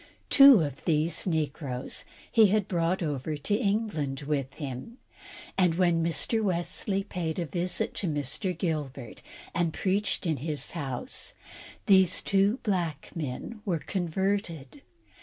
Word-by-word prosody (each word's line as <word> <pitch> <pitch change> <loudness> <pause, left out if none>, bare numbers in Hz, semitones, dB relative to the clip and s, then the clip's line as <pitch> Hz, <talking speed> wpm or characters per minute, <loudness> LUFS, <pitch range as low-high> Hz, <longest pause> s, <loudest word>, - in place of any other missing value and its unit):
Two 275 -7 +9
of 145 -3 -4
these 160 +2 +1
negroes 145 -5 -2 0.3
he 225 -3 +7
had 205 0 +1
brought 175 +1 0
over 150 0 -2
to 145 +8 -2
England 200 - -1
with 140 -2 -2
him, 140 - -6 0.6
and 180 -3 +4
when 170 -2 +3
Mr. 170 +7 +1
Wesley 195 +1 -1
paid 175 -5 -3
a 175 - -1
visit 175 +4 -2
to 195 - -1
Mr. 150 +4 -2
Gilbert, 145 - -3 0.3
and 170 -2 0
preached 200 +1 0
in 160 -4 +1
his 150 +1 -3
house, 145 - -4 0.5
these 190 -4 +5
two 200 +4 +3
black 175 -8 -1
men 165 - -5
were 185 -6 0
converted. 175 - -2
170 Hz, 130 wpm, -28 LUFS, 150-195 Hz, 0.6 s, Two